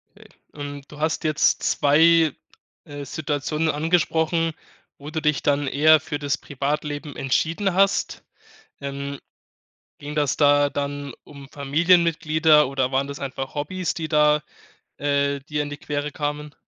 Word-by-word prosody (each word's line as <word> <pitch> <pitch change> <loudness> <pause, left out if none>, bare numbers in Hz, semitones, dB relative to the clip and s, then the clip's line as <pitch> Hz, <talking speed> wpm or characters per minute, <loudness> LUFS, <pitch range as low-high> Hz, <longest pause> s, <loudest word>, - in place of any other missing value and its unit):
Okay. - - -17 0.2
Und 145 -1 -8
du 150 - -12
hast 160 +2 -1
jetzt 155 -1 +2
2, 160 +1 +4 0.5
äh, 145 -1 -8
Situationen 150 +2 -2
angesprochen, 165 +1 +1 0.5
wo 145 +2 -9
du 160 0 -3
dich 150 -2 +1
dann 145 0 +1
eher 155 +2 +5
für 150 -1 -5
das 145 0 -1
Privatleben 145 +1 -4
entschieden 165 +8 0
hast. 195 +1 +1 0.6
Ähm, 140 0 -5 0.8
ging 145 +1 -7
das 145 -3 0
da 145 -1 +4
dann 140 -1 -4
um 140 -1 -13
Familienmitglieder 155 0 +3
oder 135 -1 -1
waren 135 +1 0
das 140 0 -7
einfach 135 0 -5
Hobbys, 165 +3 -2
die 160 -2 -4
da, 150 -1 +4 0.6
äh, 140 0 0
dir 150 +1 -3
in 145 - -6
die 145 - -7
Quere 145 0 -4
kamen? 150 0 -4
145 Hz, 140 wpm, -23 LUFS, 140-155 Hz, 0.8 s, eher